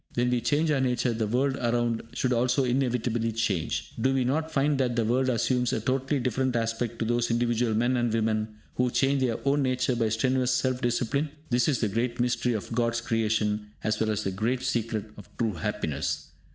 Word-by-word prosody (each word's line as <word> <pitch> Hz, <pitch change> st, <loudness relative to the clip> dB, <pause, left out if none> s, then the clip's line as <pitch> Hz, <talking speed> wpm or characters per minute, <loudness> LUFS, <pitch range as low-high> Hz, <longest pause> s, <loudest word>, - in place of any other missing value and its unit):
When 125 Hz, +1 st, +1 dB
we 125 Hz, -1 st, +1 dB
change 145 Hz, +7 st, +1 dB
our 140 Hz, -3 st, +2 dB
nature, 125 Hz, -1 st, +1 dB
the 110 Hz, -1 st, -1 dB
world 130 Hz, +4 st, +1 dB
around 120 Hz, -1 st, 0 dB
should 130 Hz, -1 st, 0 dB
also 125 Hz, +3 st, +2 dB
inevitably 120 Hz, -3 st, 0 dB
change. 85 Hz, -9 st, -1 dB
Do 130 Hz, -, +3 dB
we 130 Hz, -, +2 dB
not 155 Hz, +6 st, 0 dB
find 145 Hz, -1 st, +1 dB
that 125 Hz, -2 st, +1 dB
the 115 Hz, -1 st, +1 dB
world 130 Hz, +3 st, +2 dB
assumes 125 Hz, 0 st, +1 dB
a -, -, 0 dB
totally 135 Hz, +5 st, 0 dB
different 125 Hz, +1 st, 0 dB
aspect 115 Hz, 0 st, -1 dB
to 115 Hz, -, -1 dB
those 120 Hz, +1 st, +1 dB
individual 120 Hz, -1 st, +1 dB
men 120 Hz, +3 st, +2 dB
and 120 Hz, -1 st, +1 dB
women 110 Hz, -1 st, +1 dB, 0.3 s
who 125 Hz, 0 st, +2 dB
change 135 Hz, +2 st, +2 dB
their 120 Hz, -3 st, +1 dB
own 140 Hz, +1 st, +3 dB
nature 130 Hz, -1 st, +1 dB
by 115 Hz, -2 st, +1 dB
strenuous 125 Hz, +2 st, +1 dB
self 130 Hz, 0 st, 0 dB
discipline? 125 Hz, +5 st, 0 dB, 0.2 s
This 120 Hz, 0 st, +3 dB
is 145 Hz, -4 st, +1 dB
the 110 Hz, -, +2 dB
great 120 Hz, +4 st, -2 dB
mystery 125 Hz, 0 st, +1 dB
of 110 Hz, +1 st, -4 dB
God's 115 Hz, 0 st, +1 dB
creation 110 Hz, -2 st, -1 dB
as 110 Hz, 0 st, 0 dB
well 110 Hz, -, +1 dB
as 105 Hz, 0 st, -1 dB
the 95 Hz, -, -1 dB
great 115 Hz, +7 st, -1 dB
secret 115 Hz, -5 st, -1 dB
of 105 Hz, -, -12 dB
true 115 Hz, -3 st, 0 dB
happiness. 90 Hz, -7 st, -3 dB
120 Hz, 205 wpm, -27 LUFS, 110-130 Hz, 0.3 s, Do